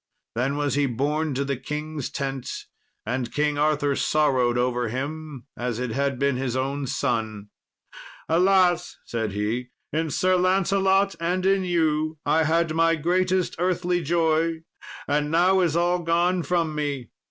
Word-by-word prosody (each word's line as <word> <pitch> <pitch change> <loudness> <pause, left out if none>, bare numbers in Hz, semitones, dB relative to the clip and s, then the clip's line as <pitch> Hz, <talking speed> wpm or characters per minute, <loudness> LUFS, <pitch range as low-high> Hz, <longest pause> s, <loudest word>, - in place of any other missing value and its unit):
Then 135 +5 -1
was 145 -3 0
he 145 0 +2
borne 145 +4 -1
to 140 +2 -1
the 140 -1 -2
king's 150 0 -5
tent, 135 -2 -4 0.4
and 125 +1 -2
King 150 0 0
Arthur 145 -2 +2
sorrowed 130 -6 +2
over 125 -1 0
him 145 +2 -5
as 120 -2 -3
it 125 -1 -3
had 140 +2 -1
been 140 0 +1
his 130 -2 -2
own 135 +1 -2
son. 110 -6 -2 0.8
"Alas!" 180 +1 +3
said 110 -3 -3
he; 110 +5 -2 0.2
"in 160 +1 0
Sir 185 +5 +2
Lancelot 195 +1 +2
and 180 +2 -1
in 195 0 +3
you 155 -2 0
I 160 0 +3
had 165 +1 +1
my 165 +1 +3
greatest 185 +3 0
earthly 180 0 0
joy, 165 0 +1 0.4
and 150 +1 0
now 180 +4 +4
is 170 -4 +1
all 175 +1 +2
gone 175 +2 +1
from 170 -2 0
me." 145 -5 -3
150 Hz, 150 wpm, -24 LUFS, 135-175 Hz, 0.8 s, now